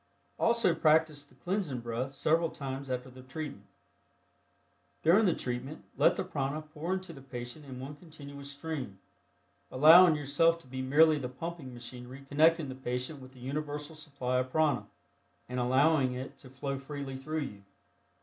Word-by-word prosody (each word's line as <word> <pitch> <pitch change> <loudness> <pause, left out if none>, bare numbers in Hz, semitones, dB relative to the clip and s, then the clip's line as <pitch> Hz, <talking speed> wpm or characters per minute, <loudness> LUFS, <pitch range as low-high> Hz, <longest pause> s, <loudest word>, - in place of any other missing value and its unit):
Also 230 -6 +3
practice 155 -2 +3
the - - -22
Cleansing 175 - -2
Breath 120 +4 -3
several 165 +4 +2
times 135 -2 -6
after 130 0 -3
the 130 +1 -12
treatment. 145 +3 -7 1.4
During 195 +7 +5
the 175 - +2
treatment 130 +5 -5
let - - +4
the - - -2
prana 150 -4 -3
pour 155 +4 -3
into 185 -2 -5
the 135 - -11
patient 125 +2 -7
in 130 -2 -8
one 135 +3 -7
continuous 140 -3 -9
stream, 140 -8 -5 0.7
allowing 160 +5 +8
yourself 150 +3 +3
to - - -19
be 130 +1 -5
merely 150 +4 +5
the 125 -3 -4
pumping 160 +1 -6
machinery 125 +2 -8
connecting 160 +2 +4
the 130 - -5
patient 130 +2 -3
with 130 0 -12
the 130 - -15
universal 145 +3 -4
supply 140 -5 -2
of 130 0 -2
prana, 150 -2 +1 0.6
and 125 0 -3
allowing 130 +2 +3
it 130 +1 -6
to 130 - -13
flow 135 +1 -4
freely 140 -1 -6
through 155 +4 -3
you. 105 -8 -7
140 Hz, 160 wpm, -31 LUFS, 130-155 Hz, 1.4 s, allowing